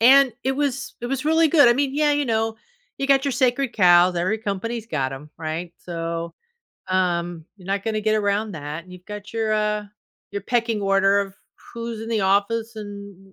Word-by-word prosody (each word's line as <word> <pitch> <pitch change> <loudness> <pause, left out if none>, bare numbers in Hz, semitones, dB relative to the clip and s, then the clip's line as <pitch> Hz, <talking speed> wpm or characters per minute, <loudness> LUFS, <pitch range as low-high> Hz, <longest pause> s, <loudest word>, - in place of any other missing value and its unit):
and 265 +1 +7
it 265 - +2
was 275 -1 -2
it 240 - -3
was 270 +2 -2
really 320 +1 +5
good 290 -4 +6
I - - +7
mean, 275 +1 0
yeah, 300 0 +3
you 290 0 +1
know, 225 -1 0 0.4
you 275 - -1
got 275 0 +4
your 280 - +1
sacred 250 0 +1
cows, 180 -2 +5
every 185 +6 0
company's 220 +2 -3
got 135 -9 -1
'em, 140 +3 -9
right? 165 +2 -4
So, 170 -1 -4 0.5
um, 175 -3 0
you're 185 -3 -15
not 195 0 -1
gonna 220 -1 -1
get 215 0 +2
around 205 +1 0
that, 155 +1 -6
and 185 - -14
you've 180 0 -12
got 210 -1 -8
your, 220 -1 0
uh 210 0 0 0.5
your 200 - -3
pecking 230 -1 0
order 195 0 +3
of 195 -1 -5 0.4
who's 230 -1 -5
in 225 - -6
the 220 -3 +1
office, 220 +4 +1
and, 200 -2 -8
y 190 - -22
210 Hz, 205 wpm, -23 LUFS, 185-235 Hz, 0.5 s, and